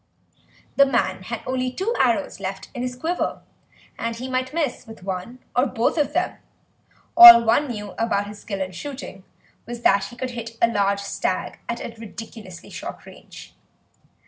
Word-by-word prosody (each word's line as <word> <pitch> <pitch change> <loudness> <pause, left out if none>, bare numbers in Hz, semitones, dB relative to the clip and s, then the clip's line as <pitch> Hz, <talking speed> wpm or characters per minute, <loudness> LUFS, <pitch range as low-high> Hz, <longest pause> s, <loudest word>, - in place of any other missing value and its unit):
The 280 - +8
man 235 -8 0
had 225 +4 -6
only 255 0 -1
two 385 - -2
arrows - - +1
left - - -5
in 245 - -5
his 250 0 -3
quiver, 330 +7 -2 0.6
and 230 0 -2
he 250 +3 -6
might 255 0 -2
miss 295 -6 -2
with 225 -4 -12
one 190 +6 -5 0.2
or 250 +3 +3
both 235 -1 0
of 300 -3 0
them; - - -1 0.8
all 350 -9 +12
one 230 +6 +3
knew 210 -5 -6
about 215 -3 0
his 205 0 -10
skill 200 -3 -5
in 185 0 -3
shooting 195 - -8 0.4
was 240 0 -6
that 195 0 +4
he 240 - -10
could 255 +1 -4
hit 230 -1 -7
a 235 - +5
large 200 -3 +1
stag 200 - -3
at 235 - -2
a 230 - -6
ridiculously 220 -4 -10
short - - -8
range. - - -13
235 Hz, 170 wpm, -23 LUFS, 205-255 Hz, 0.8 s, all